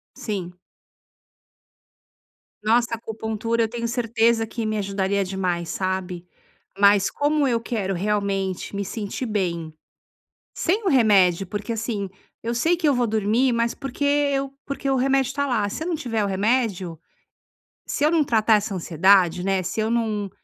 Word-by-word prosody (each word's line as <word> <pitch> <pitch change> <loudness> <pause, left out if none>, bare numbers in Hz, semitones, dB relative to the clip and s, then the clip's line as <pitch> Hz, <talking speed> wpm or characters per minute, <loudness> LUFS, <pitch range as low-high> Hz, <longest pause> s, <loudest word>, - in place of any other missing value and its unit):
Sim. 185 -5 -5 2.1
Nossa, 230 +2 +2
acupuntura, 225 0 -2
eu - - +1
tenho 235 +1 -4
certeza 230 -1 +1
que 230 0 -4
me 215 0 -1
ajudaria 200 0 0
demais, 180 -3 -2
sabe. 185 -2 -3 0.5
Mas, 200 0 +5
como 290 0 +1
eu 235 -2 +1
quero 205 -5 -2
realmente 195 -1 -2
me 200 - -1
sentir 205 +5 -4
bem, 175 -7 -2 0.8
sem 410 +6 0
o - - +2
remédio, 195 - +4
porque, 205 +4 -4
assim, 220 -3 -3 0.3
eu 235 +1 -2
sei 325 +9 +2
que 330 -2 -1
eu 285 - +4
vou 245 -1 +1
dormir, 220 +4 +2
mas 235 0 0
porque 275 +1 -5
eu 285 -1 +1
porque 280 -1 -4
o 270 - +2
remédio 270 0 +2
está 285 +2 -1
lá, 220 -6 0
se 260 - -5
eu - - -3
não 340 - 0
tiver 235 -7 -2
o - - 0
remédio 195 -4 0 0.9
Se - - -2
eu 310 - +3
não 325 -2 +3
tratar 220 -4 +3
essa 205 -1 -1
ansiedade, 180 +1 +3
né. 195 -1 +1
Se 180 - -4
eu 220 0 +1
não 220 -4 -1
220 Hz, 160 wpm, -23 LUFS, 195-245 Hz, 2.1 s, Mas